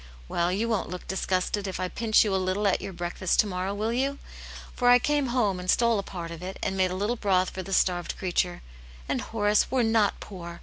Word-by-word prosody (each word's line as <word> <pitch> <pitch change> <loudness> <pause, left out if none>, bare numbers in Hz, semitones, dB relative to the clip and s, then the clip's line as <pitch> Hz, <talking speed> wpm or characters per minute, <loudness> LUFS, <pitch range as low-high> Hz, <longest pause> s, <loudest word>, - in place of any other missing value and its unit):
Well, 170 - 0
you 210 +5 0
won't 220 -4 -1
look 180 0 -7
disgusted 190 +1 -1
if 190 - -4
I 185 - -1
pinch 220 +3 +3
you 210 -3 -1
a - - +3
little 185 +3 0
at 195 - +1
your 195 - -5
breakfast 175 +1 -1
to - - -5
morrow, 190 0 -3
will 220 +3 -1
you? 275 +3 0 0.6
For 245 -1 +3
I 245 - +9
came 290 +2 +1
home 220 -7 +1
and 180 0 -6
stole 235 -1 +3
a - - 0
part 175 -3 -7
of 165 0 -8
it, 190 +1 -6
and 190 - -1
made 185 -1 +2
a 180 - -3
little 205 +5 0
broth 190 -5 +1
for 190 - -5
the 195 - -8
starved 180 -2 +1
creature, 180 -1 -1 0.4
and - - -1
Horace, 210 -1 +1
we're 260 -2 +2
not 225 -2 +2
poor 170 -3 -9
195 Hz, 235 wpm, -27 LUFS, 185-225 Hz, 0.6 s, I